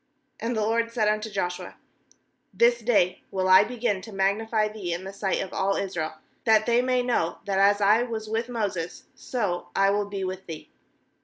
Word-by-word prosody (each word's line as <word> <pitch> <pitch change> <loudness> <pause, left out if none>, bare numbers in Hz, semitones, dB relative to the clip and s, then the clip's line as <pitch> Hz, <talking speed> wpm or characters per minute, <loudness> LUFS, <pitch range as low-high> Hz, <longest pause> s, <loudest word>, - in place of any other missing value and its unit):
7And 235 +1 -1
the 220 - 0
LORD 230 +2 0
said 225 -3 +1
unto 215 +1 0
Joshua: 180 -3 -4 0.8
'This 235 0 +4
day 205 -6 +2
will 185 -1 -1
I 185 0 +8
begin 235 -5 -2
to 220 - -10
magnify 215 +3 +1
thee 205 -5 -4
hi - - -1
the 195 +1 -7
sight 195 -1 -1
of 190 - -9
all 195 0 +1
Israel, 175 -5 -3 0.3
that 220 -1 +4
they 240 +1 +3
may 250 0 +1
know 235 -9 0
that, 195 -1 0
as 205 +1 +4
I 210 +3 +5
was 225 -3 -4
with 225 +2 -2
Moses, 200 -8 -3
so 205 -8 -3
I 195 0 +4
will 205 0 -1
be 200 -1 -4
with 185 0 -5
thee. 160 -2 -9
205 Hz, 190 wpm, -26 LUFS, 190-230 Hz, 0.8 s, I